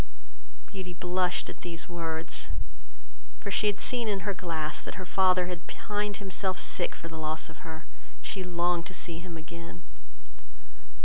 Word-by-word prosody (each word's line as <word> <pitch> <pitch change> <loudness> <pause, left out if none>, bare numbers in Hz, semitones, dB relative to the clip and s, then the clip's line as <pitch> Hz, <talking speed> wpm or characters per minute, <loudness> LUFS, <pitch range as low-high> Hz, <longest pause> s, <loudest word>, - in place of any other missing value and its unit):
Beauty 185 -3 -5
blushed 180 +1 +2
at - - -7
these 170 -1 -3
words; 165 -2 -1 1.0
she 200 +1 +4
had 205 -1 +3
seen 245 -3 +4
in 200 -2 +2
her 200 +2 +1
glass, 160 -4 -1
that - - -4
her 185 - -4
father 185 -1 +5
had 175 -1 -4
pined 205 -1 -1
himself 190 -1 +1
sick 175 - +3
for - - -6
the 160 -1 -5
loss 155 +1 0
of 160 - -11
her, 160 -2 -7 0.3
and - - -16
she 190 - 0
longed 175 -1 +2
to 185 - -6
see 170 -3 -1
him 170 -1 -5
again. 170 +1 -7
180 Hz, 165 wpm, -31 LUFS, 165-190 Hz, 1.0 s, father